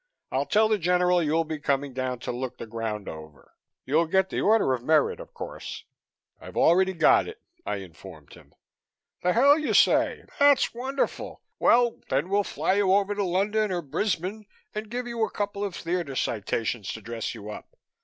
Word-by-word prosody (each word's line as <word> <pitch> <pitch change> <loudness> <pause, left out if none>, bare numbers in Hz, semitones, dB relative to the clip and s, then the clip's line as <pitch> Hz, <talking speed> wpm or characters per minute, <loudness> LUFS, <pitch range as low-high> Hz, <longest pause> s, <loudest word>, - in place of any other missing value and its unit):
I'll - - -1
tell 215 +1 +4
the 215 -1 +1
General 180 0 +3
you'll 160 +1 +1
be 155 -1 -5
coming 140 -2 -1
down 130 -1 -2
to - - -3
look 125 +1 -5
the - - -7
ground 110 -2 -4
over. 80 -2 -11 0.3
You'll 160 +5 +2
get 190 +3 +1
the - - -1
Order 215 -10 +3
of 125 - -2
Merit, 155 +3 +2
of - - -10
course - - -7 0.3
" - - -44
"I've - - -10
already 190 +3 +4
got 170 - +4
it," 440 0 -9 0.3
I - - -1
informed 85 -4 -11
him. - - -18 0.7
"The 180 0 +2
hell 280 +6 +5
you 305 - -1
say! - - +3 0.2
That's 285 -2 +5
wonderful. 260 +3 -3 0.2
Well, 240 -1 +3
then 140 +7 0
we'll 205 +1 +2
fly 185 - -1
you 200 -2 +3
over 200 +1 +3
to 205 0 -1
London 200 +3 0
or 175 -2 -2
Brisbane 190 +6 -2 0.3
and 215 0 -5
give 245 +2 -3
you 235 -2 -2
a - - 0
couple 205 -1 -3
of 195 -4 -3
theatre 170 -5 -3
citations 110 -1 -2
to 110 - -8
dress 115 +2 -5
you 105 -1 -8
up. - - -11
180 Hz, 190 wpm, -26 LUFS, 130-210 Hz, 0.7 s, hell